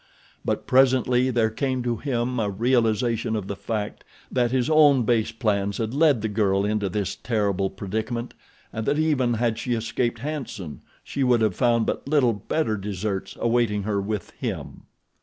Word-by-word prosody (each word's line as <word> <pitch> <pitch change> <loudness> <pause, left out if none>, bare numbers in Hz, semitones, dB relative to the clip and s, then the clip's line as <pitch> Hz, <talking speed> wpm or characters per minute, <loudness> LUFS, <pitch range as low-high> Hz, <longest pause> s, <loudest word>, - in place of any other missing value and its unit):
But - - -2
presently 130 -1 +3
there 115 -3 +1
came 130 +1 -1
to 120 -1 -1
him 125 -1 -1
a 105 -2 0
realization 115 +1 +1
of 105 -3 -3
the 100 - -3
fact 105 0 -4 0.3
that 120 -2 +2
his 125 +1 +1
own 150 -5 +5
base 115 -1 +1
plans 100 -4 -1
had 110 0 -2
led 145 -6 +3
the - - +1
girl 100 -2 +1
into 105 -1 0
this 100 0 -2
terrible 100 -5 0
predicament, 110 +5 -4 0.4
and 110 0 -4
that 145 +1 +2
even 140 -6 +2
had 115 -1 0
she 125 -2 -1
escaped 120 +1 -1
"Hanson" 115 - -6 0.2
she 140 - -2
would 125 -2 +3
have 110 -3 +2
found 120 -2 +2
but - - -3
little 140 -6 +3
better 110 +3 -1
deserts 100 0 -4
awaiting 115 -3 +1
her 100 -1 -1
with 105 -1 -4
him. - - -6
115 Hz, 170 wpm, -24 LUFS, 105-125 Hz, 0.4 s, own